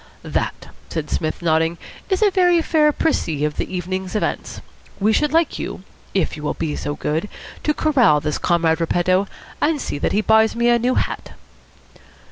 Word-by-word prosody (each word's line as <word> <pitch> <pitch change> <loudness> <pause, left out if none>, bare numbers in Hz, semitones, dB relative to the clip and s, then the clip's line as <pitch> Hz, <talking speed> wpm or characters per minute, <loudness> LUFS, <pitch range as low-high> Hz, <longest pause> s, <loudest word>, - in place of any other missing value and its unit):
"That," - - -3 0.2
said 155 -2 -4
Psmith, 155 +2 -2
nodding, 165 0 +2 0.3
"is 380 +2 +2
a 410 - +4
very 355 -2 +4
fair 305 -2 +3
précis 165 - 0
of 150 - -3
the - - -3
evening's 185 +1 -4
events. 215 - -2 0.4
We 215 +2 +3
should 300 +3 +2
like 330 -1 +1
you, - - -5 0.3
if 190 - +1
you 150 - -9
will 150 - -2
be 155 -2 -2
so 145 0 -3
good, 160 +7 -2 0.3
to 300 - +1
corral 250 - +4
this 150 0 -2
Comrade 170 -1 +2
Repetto, 185 +3 +2 0.3
and 300 0 +2
see 145 - -4
that - - 0
he 210 - +2
buys 220 0 +4
me 235 +1 +2
a 240 0 +4
new 250 +2 +1
hat." - - -2
190 Hz, 180 wpm, -21 LUFS, -, 0.4 s, a